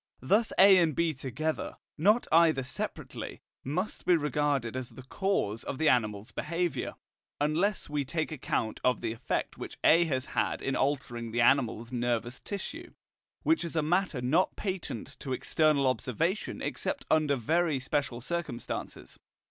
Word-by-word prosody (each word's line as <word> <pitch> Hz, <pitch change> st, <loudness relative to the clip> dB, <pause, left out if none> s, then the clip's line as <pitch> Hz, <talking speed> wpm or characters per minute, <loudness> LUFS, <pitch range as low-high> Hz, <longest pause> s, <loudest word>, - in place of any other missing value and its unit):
Thus 210 Hz, -, +2 dB
A 190 Hz, -1 st, +8 dB
and 160 Hz, -5 st, +2 dB
B 170 Hz, -1 st, +1 dB
together, 145 Hz, +4 st, -3 dB, 0.2 s
not 210 Hz, +9 st, +3 dB
either 160 Hz, -4 st, +5 dB
separately, 130 Hz, -, -5 dB, 0.2 s
must 180 Hz, +10 st, -3 dB
be 180 Hz, -, +5 dB
regarded 145 Hz, -5 st, 0 dB
as 130 Hz, -2 st, -4 dB
the 130 Hz, -, -12 dB
cause 130 Hz, -, -1 dB
of -, -, -4 dB
the 160 Hz, +1 st, +3 dB
animal's 110 Hz, -4 st, +1 dB
behaviour, 170 Hz, +3 st, -2 dB, 0.4 s
unless 170 Hz, +8 st, +1 dB
we 150 Hz, -1 st, -1 dB
take 155 Hz, +4 st, -2 dB
account 120 Hz, -6 st, -2 dB
of 125 Hz, 0 st, +2 dB
the -, -, -1 dB
effect 115 Hz, -, -3 dB
which -, -, -7 dB
A 170 Hz, +2 st, +6 dB
has 130 Hz, -4 st, -1 dB
had -, -, -1 dB
in 135 Hz, -, 0 dB
altering 125 Hz, -4 st, -1 dB
the 120 Hz, +2 st, 0 dB
animal's 120 Hz, -2 st, +2 dB
nervous 120 Hz, 0 st, -1 dB
tissue, 325 Hz, -, -6 dB, 0.5 s
which 320 Hz, 0 st, +3 dB
is 170 Hz, -1 st, -5 dB
a 155 Hz, -, +2 dB
matter 175 Hz, -4 st, +1 dB
not 155 Hz, +9 st, +2 dB
patent 185 Hz, -, -4 dB
to 130 Hz, -, -4 dB
external 150 Hz, +1 st, +2 dB
observation 145 Hz, -, -1 dB
except 280 Hz, -1 st, -2 dB
under 155 Hz, -2 st, +3 dB
very 155 Hz, +4 st, +1 dB
special 130 Hz, -2 st, -2 dB
circumstances. 170 Hz, -4 st, -5 dB
150 Hz, 150 wpm, -30 LUFS, 125-170 Hz, 0.5 s, A